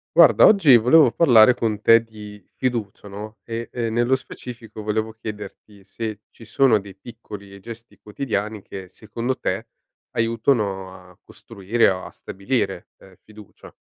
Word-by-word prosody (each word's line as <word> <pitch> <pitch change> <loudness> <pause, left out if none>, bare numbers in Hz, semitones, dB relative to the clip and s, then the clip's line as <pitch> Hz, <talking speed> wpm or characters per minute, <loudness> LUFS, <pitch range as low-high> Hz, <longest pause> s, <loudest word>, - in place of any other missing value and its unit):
Guarda - - +7
oggi 165 - +6
volevo 125 +3 +5
parlare 125 -6 +6
con 110 -3 -2
te 115 +1 +5
di 105 -3 -13
fiducia 115 -6 -3
no, 105 +2 -9
ehm, 115 0 -5
e 115 -2 -3
nello 120 +3 +1
specifico 115 -4 -10
volevo 110 +1 -2
chiederti 105 -2 -10
se 110 -1 -6
ci 115 - -16
sono 115 +1 +2
dei 100 -1 -13
piccoli 100 -2 -11
gesti 115 +3 -12
quotidiani 105 -2 -4
che 95 -1 -10
secondo 115 +6 -5
te - - -3 0.4
aiutano 110 -5 -1 0.2
a 90 - -23
costruire 105 +4 -1
o 95 -1 -3
a - - -10
stabilire, 100 -2 -4
uhm, 95 -1 -19
fiducia. 105 -1 -16
110 Hz, 145 wpm, -22 LUFS, 100-120 Hz, 0.4 s, Guarda